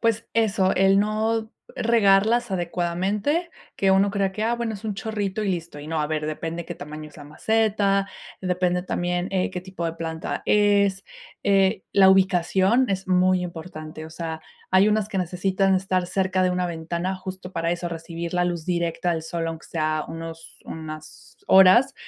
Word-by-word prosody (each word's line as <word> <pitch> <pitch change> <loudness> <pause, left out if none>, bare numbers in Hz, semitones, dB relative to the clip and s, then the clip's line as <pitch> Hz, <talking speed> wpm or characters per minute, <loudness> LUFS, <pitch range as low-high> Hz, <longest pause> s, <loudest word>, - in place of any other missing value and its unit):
Pues, 230 -1 0
eso, 210 -4 +2
el 195 +1 +4
no 220 +2 0 0.2
regarlas 225 +1 +3
adecuadamente, 190 - -1 0.3
que 195 - +2
uno 195 +1 +4
crea 195 -1 0
que 210 - -4
ah, 230 +2 +1
bueno, 235 -2 -3
es 205 +2 -10
un 215 - -1
chorrito 210 -1 -3
y 205 - -1
listo, 170 -4 -3
y 145 - -9
no 160 0 -1
a 150 - 0
ver, 155 -1 -2
depende 165 +2 -4
qué - - -5
tamaño 155 +1 -8
es 150 - -18
la 145 - -10
maceta, 200 +4 +1 0.4
depende 180 -1 0
también, 175 0 -2
eh, 185 -1 0
qué 180 - -5
tipo 185 -3 -5
de 165 - -3
planta 165 -1 -4
es, 200 -2 +3 0.4
eh, 195 0 +3
la 190 -1 +7
ubicación 190 +5 +3
es 190 -1 -2
muy 185 0 +3
importante, 160 -3 -7
o 160 - -10
sea, 160 -1 -5 0.3
hay 190 +2 +5
unas 215 -1 +1
que 210 - -5
necesitan 190 +2 +1
estar 185 -1 0
cerca 190 0 0
de 185 - +3
una 180 0 0
ventana, 170 +2 -3
justo, 185 0 -8
para 165 -1 -1
eso, 175 0 -2
recibir 170 +1 -6
la 180 0 +2
luz 175 -2 -3
directa 170 -1 0
del 160 - -3
sol, 165 +1 -3
aunque 165 0 -6
sea 155 -1 -1
unos 165 0 -8
unas 155 -1 -9
horas, 190 +8 +6
185 Hz, 180 wpm, -24 LUFS, 170-200 Hz, 0.4 s, la